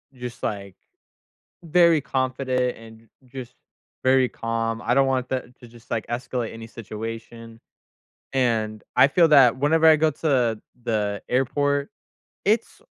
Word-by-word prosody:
just, 125 -1 -8
like, 100 -2 -4 0.9
very 170 -1 +4
confident 130 -1 -1
and 110 0 -14 0.3
j 130 +1 -9
just 125 +1 -13 0.5
very 130 -1 +4
calm, 115 0 -3
I 120 - 0
don't 135 0 +4
want 130 -1 0
that 125 -1 -4
to 120 - -13
just, 115 0 -18
like, 115 - -2
escalate 120 -1 -3
any 115 0 -9
situation. 115 +1 -8 0.7
And 110 -5 0
I - - +7
feel 165 +4 +4
that 130 -5 +6
whenever 160 +4 +3
I 155 - +8
go 155 +1 +2
to 125 -7 0 0.2
the 105 -3 -1
airport, 140 +3 0 0.6
it's 220 +3 0
125 Hz, 140 wpm, -24 LUFS, 115-135 Hz, 0.9 s, I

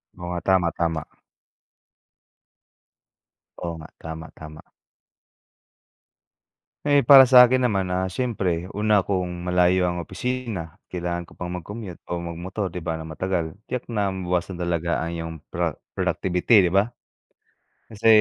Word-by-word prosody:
Oo 90 - -8
nga, 90 - -2
tama, 95 -2 +4
tama. 80 -1 -1 2.6
Oo 85 -1 -3
nga. 80 - -11
Tama, 80 0 -7
tama. 75 0 -10 2.2
Eh, 145 -1 +5
para 135 +1 +9
sakin 125 0 +7
naman, 95 -5 0
ah, 90 +1 0
syempre, 95 -5 -2
una 105 0 +2
kung 90 -2 -2
malayo 90 0 +3
ang 85 - -3
opisina 95 -2 -4
kailangan 85 -1 -3
ko - - -16
pang 90 -1 -5
mag-commute 90 +1 -7
o - - -2
magmotor, 90 +4 -4
di 90 - -5
ba, 80 -1 -1
ng 80 - -8
matagal 85 -1 -2 0.2
tiyak 125 -1 -4
na 105 -3 0
mabawasan 90 0 -2
talaga 85 -1 0
ang 85 - -3
'yong 80 0 -5 0.2
pro - - -1 0.2
productivity, 90 +1 +3
di - - -9
ba? 100 +5 +2 1.0
Kasi 110 +1 -1
90 Hz, 130 wpm, -24 LUFS, 85-105 Hz, 2.6 s, para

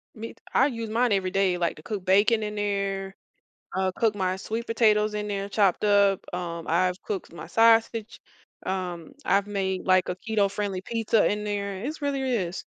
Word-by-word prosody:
Meat, 225 +1 -8
I 265 - +5
use 230 -4 -5
mine 240 +2 +1
every 190 -2 +1
day, 195 -2 +2
like 170 -2 -1
to 155 - -14
cook 205 -4 -5
bacon 205 +4 +4
in 210 0 -4
there, 195 -2 -2 0.6
uh, 190 -1 +1
cook 220 -2 +2
my 185 -1 0
sweet 225 +4 -4
potatoes 215 -2 +2
in 210 0 -3
there, 200 0 -3
chopped 200 -1 +2
up, 200 -2 +4
um, 170 -2 -4
I've 180 +2 +1
cooked 195 -5 -5
my 170 - -9
sausage, 225 -1 +3 0.5
um, 180 +3 -4
I've 200 -2 +2
made 190 -2 -2
like 185 -1 +4
a 180 - -2
keto-friendly 200 -2 0
pizza 225 -1 +1
in 210 0 -2
there, 200 -1 -3
it's 300 +1 -5
really 280 -1 -1
is. 205 -9 -2
200 Hz, 180 wpm, -26 LUFS, 190-220 Hz, 0.6 s, I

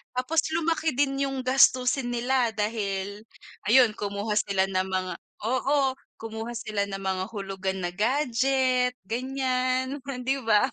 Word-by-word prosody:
tapos 275 +6 +1
lumaki 325 0 +1
din 275 0 +1
'yong 270 -1 -2
gastusin 255 -1 +4
nila. 245 0 +1
Dahil, 205 -1 -2 0.4
ayun 235 -2 +6
kumuha 205 +1 -3
sila 195 -2 +2
ng 185 0 0
mga 185 -1 -1 0.3
oo, 265 +2 +1 0.2
kumuha 225 +1 -5
sila 215 -3 -2
ng 195 -1 -6
mga 190 -1 -1
hulugan 195 -2 -3
na 175 - -1
gadget, 255 +2 +2
ganiyan, 255 +2 -1
frien 265 -2 -5
'di 265 +2 +1
ba. 220 +2 +4
245 Hz, 135 wpm, -26 LUFS, 205-265 Hz, 0.4 s, ayun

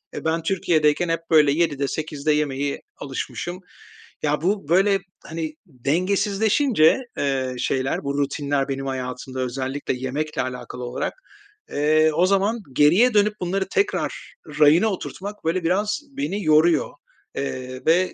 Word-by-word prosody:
E, - - -6
ben 160 +1 0
Türkiye'deyken 165 -2 +2
hep 165 - +1
böyle 150 -3 +6
19:00'de 145 -3 +1
20:00'de 155 0 -2
yemeye 145 -1 -1 0.2
alışmışım. 160 +6 -5 0.6
Ya, 150 0 +1
bu 190 -3 -1
böyle, 195 +3 +4 0.3
hani, 160 -2 -4
dengesizleşince, 195 - +2 0.2
eee, 130 -2 -1
şeyler, 135 +3 -1
bu 140 0 -2
rutinler 140 0 -1
benim 135 0 -3
hayatımda, 130 0 -5
özellikle 130 +3 -2
yemekle 135 +5 -3
alakalı 125 0 -6
olarak, 120 +1 -3 0.6
eee, 155 +2 +3
o 175 - +3
zaman 200 +4 +2
geriye 180 - +5
dönüp 210 0 +4
bunları 190 +2 -1
tekrar 410 +1 -1 0.3
rayına 155 +7 +6
oturtmak 200 0 -5
böyle 165 +2 0
biraz 205 +6 +1 0.2
beni 210 -8 -2
yoruyor, 155 +1 +4 0.5
eee, 130 -2 -4
ve 180 +3 +3
155 Hz, 130 wpm, -23 LUFS, 140-185 Hz, 0.6 s, böyle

